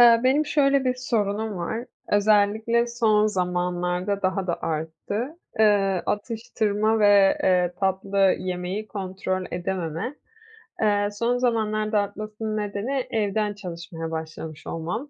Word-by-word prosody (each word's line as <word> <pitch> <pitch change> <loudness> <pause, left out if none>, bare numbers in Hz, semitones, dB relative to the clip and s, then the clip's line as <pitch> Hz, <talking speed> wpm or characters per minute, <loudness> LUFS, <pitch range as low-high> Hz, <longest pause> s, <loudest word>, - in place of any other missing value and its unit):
Iıı, 235 -1 +8
benim 285 +4 +3
şöyle 275 -2 +3
bir 255 - +2
sorunum 220 -4 -1
var. 220 +8 -3 0.3
Özellikle 215 +3 +3
son 220 -3 +3
zamanlarda 180 0 -1
daha 185 0 0
da 170 - -2
arttı. 200 - -3 0.2
Eee, 200 -4 +3
atıştırma 220 -1 0
ve, 200 -2 +5
eee, 180 -1 +3
tatlı 195 0 +2
yemeyi 185 +3 -4
kontrol 185 -2 -3
edememe. 175 - -3 0.7
Eee, 205 -1 +2
son 235 +4 0
zamanlarda 215 -3 +1
artmasının 215 +1 -4
nedeni 210 +6 -2
evden 210 -1 0
çalışmaya 170 -4 -7
başlamış 160 -1 -6
olmam. 180 - -4
205 Hz, 115 wpm, -25 LUFS, 185-220 Hz, 0.7 s, Iıı